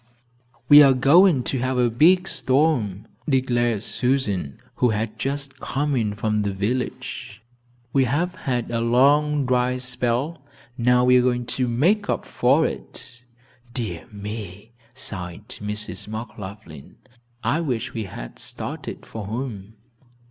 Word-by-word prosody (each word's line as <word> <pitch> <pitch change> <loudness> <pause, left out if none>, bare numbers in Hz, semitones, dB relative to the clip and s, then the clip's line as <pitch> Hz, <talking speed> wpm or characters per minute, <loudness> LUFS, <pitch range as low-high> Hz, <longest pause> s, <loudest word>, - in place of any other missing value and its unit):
"We 145 +2 +10
are 135 -2 +6
going 145 +2 +5
to 130 - -2
have 130 +1 -1
a 120 -2 +3
big 180 +10 +4
storm," 130 - +1 0.2
declared 120 -5 +1
Susan, 110 - -1 0.2
who 125 - +3
had 110 +1 -2
just 140 0 -3
come 145 +1 -1
in 105 -4 0
from 105 0 0
the 100 -1 -1
village. 110 +4 -4 0.5
"We 135 -1 +4
have 165 +8 0
had 125 -10 -3
a 115 -1 0
long 140 +5 +3
dry 125 0 +1
spell, 125 +4 -2 0.3
now 125 0 +3
we 125 0 +6
are - - +5
going 125 -1 0
to 130 -1 0
make 180 - +2
up - - -1
for - - +3
it." 120 - -7 0.5
"Dear 110 -9 -4
me," 105 0 -7 0.2
sighed 90 -5 -5
Mrs. 105 0 -4
McLaughlin, 105 - -8 0.5
"I 160 - +1
wish 125 -8 -2
we 110 -3 -3
had - - -9
started - - -6
for 110 -3 -7
home." 110 -3 -5
125 Hz, 135 wpm, -23 LUFS, 105-135 Hz, 0.5 s, We